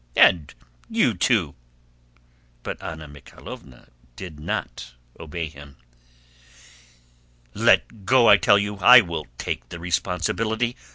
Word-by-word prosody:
"And 80 -5 +4 0.4
you - - +1
too!" - - 0 1.1
But - - -6
Anna 80 -1 -8
Mikháylovna 70 -3 -13 0.3
did 80 -3 -10
not 60 -4 -6 0.2
obey 80 +1 -5
him. 70 -2 -14 1.8
"Let 110 -4 +1
go, 120 +3 +4
I 100 - +8
tell 100 - +4
you! 100 0 -3
I 120 +5 +8
will 85 - -6
take - - -5
the - - -8
responsibility. 110 +7 -2
85 Hz, 110 wpm, -23 LUFS, 75-105 Hz, 1.8 s, I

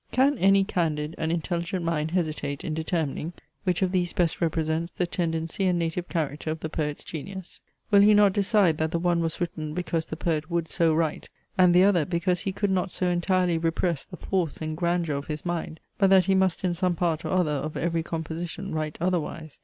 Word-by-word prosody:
Can 270 +3 +3
any 195 +1 +5
candid 155 -5 -1
and 160 - 0
intelligent 170 +1 -2
mind 160 -2 0
hesitate 155 -5 -2
in 155 - -3
determining, 160 0 -2 0.3
which 180 0 +1
of 185 - +1
these 180 -2 0
best 175 -1 0
represents 160 0 0
the 180 - -1
tendency 165 +1 -2
and 180 -1 +2
native 170 +1 -2
character 155 -2 -2
of 160 +1 -2
the 160 - -3
poet's 150 -2 -3
genius? 185 +4 -7 0.3
Will 200 -1 +7
he 210 +1 +6
not 205 -2 +5
decide 200 -5 +3
that 160 0 +1
the 170 - -1
one 175 0 +1
was 165 -1 -2
written 155 -3 -3
because 170 -2 -1
the 155 - -5
poet 160 -1 -1
would 170 -2 -1
so 165 -1 +3
write, 160 -1 -1 0.3
and 180 -1 +5
the 180 - +7
other 190 -5 +4
because 175 +1 0
he 195 - -1
could 200 +1 -1
not 190 0 +1
so 180 +1 -1
entirely 175 -1 +1
repress 165 -1 0
the 180 - -10
force 180 -6 -1
and 155 0 -3
grandeur 170 -2 0
of 140 - -6
his 150 +1 -5
mind, 170 -2 -3 0.2
but 195 -2 +5
that 190 -2 +6
he 195 - +3
must 190 -2 +2
in 180 -2 +1
some 180 0 0
part 165 -1 0
or 160 - -3
other 180 -4 +2
of 150 +1 -3
every 165 0 0
composition 165 +3 -5
write 155 -1 -3
otherwise? 165 -3 -2
170 Hz, 210 wpm, -26 LUFS, 160-185 Hz, 0.3 s, Will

